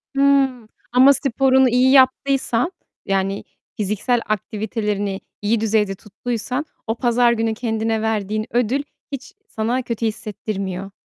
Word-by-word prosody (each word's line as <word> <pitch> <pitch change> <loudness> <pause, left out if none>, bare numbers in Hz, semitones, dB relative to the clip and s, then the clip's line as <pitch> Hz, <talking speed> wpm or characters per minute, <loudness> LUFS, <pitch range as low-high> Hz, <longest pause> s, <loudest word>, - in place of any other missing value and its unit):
Hımm, 270 -4 +3 0.2
ama 260 +3 +7
sporunu 265 -1 +3
iyi 250 +2 +4
yaptıysan, 265 +1 +3 0.3
yani 195 0 -1 0.3
fiziksel 215 +4 0
aktivitelerini 210 -1 -2 0.2
iyi 215 +2 +1
düzeyde 210 -3 +1
tuttuysan 235 +7 -4 0.2
o 225 - 0
pazar 240 0 +3
günü 225 -1 0
kendine 225 -1 -1
verdiğin 215 -1 -1
ödül 245 +4 +1 0.3
hiç 275 +8 -7
sana 235 +4 -1
kötü 235 -2 -3
hissettirmiyor. 200 -3 -4
225 Hz, 115 wpm, -21 LUFS, 210-255 Hz, 0.3 s, ama